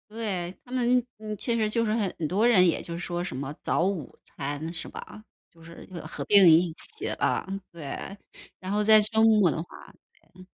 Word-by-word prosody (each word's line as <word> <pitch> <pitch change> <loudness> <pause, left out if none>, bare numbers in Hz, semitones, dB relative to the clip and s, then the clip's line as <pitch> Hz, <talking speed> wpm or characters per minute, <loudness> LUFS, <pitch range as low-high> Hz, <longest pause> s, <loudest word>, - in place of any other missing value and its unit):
对， 195 -6 -4
他 245 - -17
们， 250 0 +2 0.2
嗯， 215 -1 -7
其 235 +4 -2
实 215 -2 0
就 230 +1 0
是 215 - -1
很 210 -5 -2
多 200 +8 0
人 195 -7 +5
也 170 - -1
就 170 0 -7
说 175 0 -4
什 180 - -6
么， 135 +2 -6
早 170 - 0
午 185 -8 -4
餐 145 +3 -6
是 165 - -8
吧？ 215 - -11 0.3
就 165 -1 -21
是 165 +1 -13 0.2
合 155 - -7
并 200 -4 +6
一 165 +2 +4
起， 440 - +7
嗯， 195 +1 -2
对。 170 +4 -8 0.4
然 185 - -8
后 210 +1 0
在 215 0 +6
周 220 +1 0
末 215 -5 +4
的 - - -3
话 - - -18 0.7
嗯。 185 0 -15
195 Hz, 210 characters per minute, -26 LUFS, 170-215 Hz, 0.7 s, 起